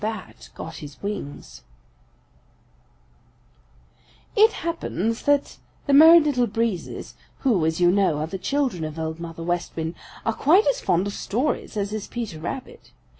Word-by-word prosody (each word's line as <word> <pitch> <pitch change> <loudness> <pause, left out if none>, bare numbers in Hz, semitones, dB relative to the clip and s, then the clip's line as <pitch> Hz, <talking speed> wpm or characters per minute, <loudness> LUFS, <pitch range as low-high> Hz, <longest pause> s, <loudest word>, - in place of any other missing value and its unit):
BAT 135 - -5
GOT - - -7
HIS 145 -1 -10
WINGS 145 - -6 2.7
|IT 435 +2 +6
happens 230 - -2
that 285 -1 +1 0.3
the 285 - +1
Merry 320 +4 +10
Little 280 -6 +1
Breezes, 220 -4 -3 0.3
who, 225 - +2
as 160 +1 -1
you 175 0 +5
know, 190 -5 +2
are 150 - -1
the 190 +4 -6
children 265 - -1
of 155 0 -5
Old 160 0 -4
Mother 165 -1 -7
West 175 0 -2
Wind, 160 0 -3 0.3
are 225 - +1
quite 345 - +4
as - - +1
fond 175 +3 +1
of 205 - -3
stories 240 +1 -2
as 205 0 -2
is 215 -2 -4
Peter 225 -10 -5
Rabbit. 265 - -7
205 Hz, 150 wpm, -24 LUFS, 165-275 Hz, 2.7 s, Merry